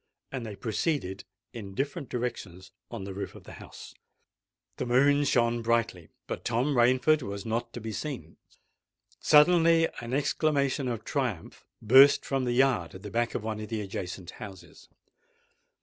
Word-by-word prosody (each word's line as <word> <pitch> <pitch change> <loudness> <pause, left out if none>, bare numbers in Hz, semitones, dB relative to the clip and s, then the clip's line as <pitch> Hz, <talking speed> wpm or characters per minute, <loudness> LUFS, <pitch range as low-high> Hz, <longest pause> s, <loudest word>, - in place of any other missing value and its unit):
And 125 -4 -5
they 105 - -7
proceeded 110 - -2 0.3
in 100 -5 -8
different 140 - -3
directions 100 -7 -5 0.2
on - - -6
the 95 0 -6
roof 100 - -6
of - - -12
the - - -12
house. - - -12 0.8
The 125 - -3
moon 140 +4 +4
shone 120 -2 +2
brightly, 115 -7 -1 0.2
but - - -6
Thomas 125 +5 0
Rainford 130 +5 +4
was 100 -4 -6
not 115 +1 -2
to - - -6
be 110 0 -6
seen. 135 +5 -6 0.8
Suddenly 165 +1 +5
an 120 +2 -4
exclamation 140 -2 0
of 115 -3 -3
triumph 125 - -4 0.2
burst 135 +6 +7
from 135 -2 -1
the 120 - 0
yard 120 -11 +1
at 95 - -11
the 105 - -7
back 120 +2 -1
of 105 - -3
one 110 -1 -4
of 105 -1 -7
the 110 -2 -3
adjacent 95 -2 -6
houses. 100 -3 -11
120 Hz, 160 wpm, -28 LUFS, 105-135 Hz, 0.8 s, burst